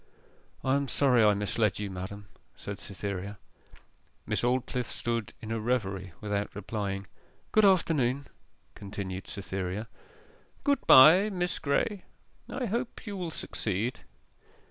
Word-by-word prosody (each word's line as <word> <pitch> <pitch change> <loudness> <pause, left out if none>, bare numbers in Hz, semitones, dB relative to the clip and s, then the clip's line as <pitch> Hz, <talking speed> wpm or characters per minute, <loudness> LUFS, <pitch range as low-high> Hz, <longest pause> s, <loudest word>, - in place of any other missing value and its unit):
'I 130 +1 +2
am 140 0 -1
sorry 125 -4 +4
I 105 -1 +5
misled 105 -1 +1
you, 105 -1 -4
madam,' 95 +2 -7 0.3
said 100 -1 -7
Cytherea. 100 0 -5 0.9
Miss - - -1
Aldclyffe 125 0 0
stood 115 -2 -2
in 110 - -6
a 115 - -1
reverie, 100 -6 -1
without 105 -1 -2
replying. 100 -1 -3 0.5
'Good 215 -1 +5
afternoon,' 140 -8 +3 0.5
continued 95 -2 -6
Cytherea. 95 +1 -4 0.8
'Good 285 -2 +1
bye, 165 +10 +9
Miss 180 -3 -1
Graye 185 +7 0 0.5
I 260 - -2
hope 235 +4 -3
you 205 -2 -5
will 180 -3 -3
succeed. 110 - -2
115 Hz, 120 wpm, -29 LUFS, 100-145 Hz, 0.9 s, bye